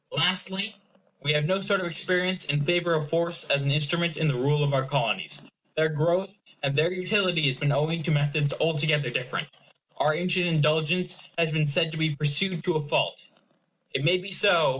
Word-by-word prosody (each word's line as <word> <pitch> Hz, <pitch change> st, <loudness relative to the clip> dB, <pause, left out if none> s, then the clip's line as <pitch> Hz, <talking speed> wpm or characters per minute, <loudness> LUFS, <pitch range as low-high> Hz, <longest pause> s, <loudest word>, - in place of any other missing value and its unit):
Lastly, 185 Hz, +6 st, +1 dB, 0.5 s
we 145 Hz, +1 st, +2 dB
have 150 Hz, 0 st, +1 dB
no 190 Hz, +4 st, 0 dB
sort 200 Hz, 0 st, +1 dB
of 185 Hz, -, -4 dB
experience 180 Hz, +2 st, 0 dB
in 145 Hz, 0 st, -1 dB
favor 175 Hz, 0 st, +2 dB
of 155 Hz, -1 st, -2 dB
force 170 Hz, +1 st, +1 dB
as 140 Hz, -, +3 dB
an 140 Hz, -, -1 dB
instrument 155 Hz, +3 st, +1 dB
in 160 Hz, -, 0 dB
the 145 Hz, -, +2 dB
rule 145 Hz, +4 st, +1 dB
of 140 Hz, -1 st, 0 dB
our 135 Hz, -1 st, +2 dB
Colonies. 140 Hz, +1 st, -2 dB, 0.3 s
Their 155 Hz, 0 st, +2 dB
growth 175 Hz, +6 st, -1 dB, 0.2 s
and 140 Hz, 0 st, 0 dB
their 155 Hz, +4 st, +2 dB
utility 185 Hz, -3 st, +1 dB
has 135 Hz, -2 st, +2 dB
been 145 Hz, +2 st, -1 dB
owing 155 Hz, +3 st, 0 dB
to 160 Hz, -, -4 dB
methods 145 Hz, -1 st, +1 dB
altogether 155 Hz, -2 st, +1 dB
different. -, -, -3 dB, 0.5 s
Our 155 Hz, +1 st, +2 dB
ancient 180 Hz, +1 st, +1 dB
indulgence 160 Hz, +3 st, +1 dB, 0.2 s
has 165 Hz, -1 st, +1 dB
been 155 Hz, -1 st, +1 dB
said 165 Hz, +3 st, +2 dB
to 160 Hz, -, -6 dB
be 160 Hz, -2 st, 0 dB
pursued 160 Hz, +4 st, -1 dB
to 180 Hz, -4 st, 0 dB
a -, -, -2 dB
fault. 145 Hz, -, -1 dB, 0.7 s
It 135 Hz, -, -2 dB
may 175 Hz, +4 st, +4 dB
be 190 Hz, +2 st, -8 dB
so. 175 Hz, -4 st, +4 dB
160 Hz, 195 wpm, -26 LUFS, 150-180 Hz, 0.7 s, may